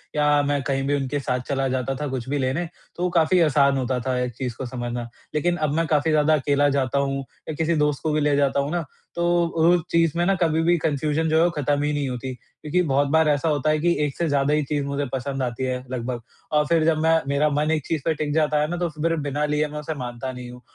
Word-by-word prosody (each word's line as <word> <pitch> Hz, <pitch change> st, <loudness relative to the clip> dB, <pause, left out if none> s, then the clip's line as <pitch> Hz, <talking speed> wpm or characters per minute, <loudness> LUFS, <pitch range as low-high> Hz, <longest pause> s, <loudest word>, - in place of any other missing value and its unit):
या 150 Hz, -1 st, +3 dB
मैं 145 Hz, -1 st, +1 dB
कहीं 135 Hz, -1 st, -1 dB
भी 145 Hz, -, +2 dB
उनके 140 Hz, +1 st, -2 dB
साथ 125 Hz, -2 st, -1 dB
चला 135 Hz, -1 st, 0 dB
जाता 130 Hz, +1 st, -1 dB
था 145 Hz, -, -1 dB
कुछ 130 Hz, -1 st, -4 dB
भी 145 Hz, -, 0 dB
लेने 135 Hz, +7 st, -1 dB, 0.3 s
तो 180 Hz, +1 st, -1 dB
काफ़ी 170 Hz, +2 st, +3 dB
आसान 140 Hz, -3 st, +3 dB
होता 130 Hz, -1 st, -1 dB
था 130 Hz, -1 st, 0 dB
एक 125 Hz, -1 st, -2 dB
चीज़ 125 Hz, -3 st, -4 dB
को 130 Hz, -, -4 dB
समझना। 120 Hz, -1 st, -4 dB, 0.3 s
लेकिन 175 Hz, +3 st, +1 dB
अब 150 Hz, -2 st, 0 dB
मैं 165 Hz, 0 st, +1 dB
काफ़ी 155 Hz, +1 st, +2 dB
ज़्यादा 155 Hz, 0 st, +3 dB
अकेला 145 Hz, 0 st, +2 dB
जाता 140 Hz, 0 st, 0 dB
हूँ 135 Hz, 0 st, -1 dB, 0.3 s
या -, -, -2 dB
किसी 160 Hz, +1 st, 0 dB
दोस्त 150 Hz, -1 st, 0 dB
को 155 Hz, -, 0 dB
भी 155 Hz, -, +1 dB
ले 145 Hz, -1 st, +2 dB
जाता 140 Hz, 0 st, +2 dB
हूँ 140 Hz, +3 st, -1 dB
ना, 170 Hz, -3 st, -1 dB, 0.3 s
तो 175 Hz, 0 st, +2 dB
उस 170 Hz, +1 st, +3 dB
चीज़ 165 Hz, -2 st, +3 dB
में 175 Hz, -, +2 dB
ना 195 Hz, +1 st, +3 dB
कभी 160 Hz, -1 st, +2 dB
भी 175 Hz, +1 st, +3 dB
कन्फ़्यूज़न 155 Hz, +1 st, 0 dB
जो 160 Hz, -, +3 dB
है 165 Hz, -, +5 dB
वो 175 Hz, -, +4 dB
खत्म 145 Hz, -2 st, 0 dB
ही 150 Hz, 0 st, 0 dB
नहीं 145 Hz, -2 st, -1 dB
होती 125 Hz, +1 st, -4 dB
क्योंकि 150 Hz, +8 st, -3 dB
बहुत 140 Hz, +1 st, +2 dB
बार 160 Hz, 0 st, +4 dB
ऐसा 150 Hz, +2 st, +1 dB
होता 150 Hz, 0 st, +1 dB
है 155 Hz, 0 st, +2 dB
कि 170 Hz, +2 st, +2 dB
एक 140 Hz, -, -4 dB
से 170 Hz, -, 0 dB
ज़्यादा 140 Hz, +1 st, +2 dB
ही 150 Hz, -1 st, +2 dB
चीज़ 145 Hz, 0 st, -2 dB
मुझे 140 Hz, 0 st, -2 dB
पसंद 135 Hz, 0 st, -2 dB
आती 125 Hz, +1 st, -3 dB
है 130 Hz, -1 st, -1 dB
लगभग, 120 Hz, -1 st, -3 dB, 0.3 s
और 150 Hz, 0 st, +3 dB
फिर 165 Hz, -2 st, +3 dB
जब 160 Hz, -1 st, +3 dB
मैं 160 Hz, 0 st, +4 dB
मेरा 145 Hz, +2 st, +2 dB
मन 150 Hz, +2 st, 0 dB
एक 155 Hz, -3 st, -1 dB
चीज़ 160 Hz, -4 st, -1 dB
पे 165 Hz, -, +2 dB
टिक 145 Hz, -1 st, -3 dB
जाता 150 Hz, -1 st, +2 dB
है 150 Hz, -, +1 dB
ना 175 Hz, -, -2 dB
तो 175 Hz, -1 st, -1 dB
फिर 160 Hz, +2 st, -1 dB
बिना 145 Hz, +2 st, 0 dB
लिए 150 Hz, 0 st, 0 dB
मैं 150 Hz, 0 st, -6 dB
उसे 155 Hz, +1 st, -4 dB
मानता 125 Hz, +1 st, -5 dB
नहीं 125 Hz, -1 st, -8 dB
हूँ। 125 Hz, 0 st, -12 dB
145 Hz, 265 wpm, -23 LUFS, 135-160 Hz, 0.3 s, है